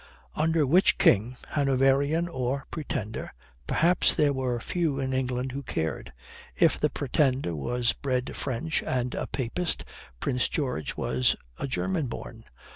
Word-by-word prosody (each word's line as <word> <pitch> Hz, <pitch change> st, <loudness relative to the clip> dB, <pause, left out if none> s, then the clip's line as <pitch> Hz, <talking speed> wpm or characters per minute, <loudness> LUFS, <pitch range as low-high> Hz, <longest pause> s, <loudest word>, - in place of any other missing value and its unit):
"Under 160 Hz, 0 st, +2 dB
which 180 Hz, +9 st, +4 dB
King" 115 Hz, +5 st, +4 dB
Hanoverian 140 Hz, +3 st, +2 dB
or 135 Hz, -3 st, -2 dB
Pretender 110 Hz, -, -4 dB, 0.4 s
perhaps 175 Hz, +2 st, +3 dB
there 145 Hz, -2 st, +3 dB
were 130 Hz, -3 st, -1 dB
few 155 Hz, +1 st, -1 dB
in 130 Hz, -1 st, -1 dB
England 130 Hz, 0 st, -1 dB
who 140 Hz, +2 st, -4 dB
cared. 80 Hz, -, -3 dB, 0.4 s
If -, -, +3 dB
the -, -, +2 dB
Pretender 130 Hz, -, +1 dB
was 120 Hz, -, 0 dB
bred 130 Hz, -2 st, -2 dB
French 140 Hz, +4 st, -1 dB
and 125 Hz, -1 st, -1 dB
a -, -, -3 dB
Papist, 140 Hz, +7 st, -2 dB, 0.3 s
Prince 125 Hz, -, 0 dB
George 125 Hz, -, -2 dB
was 65 Hz, -1 st, +2 dB, 0.2 s
a -, -, -2 dB
German 160 Hz, +2 st, -1 dB
born. 115 Hz, -1 st, -8 dB
130 Hz, 135 wpm, -27 LUFS, 125-150 Hz, 0.4 s, which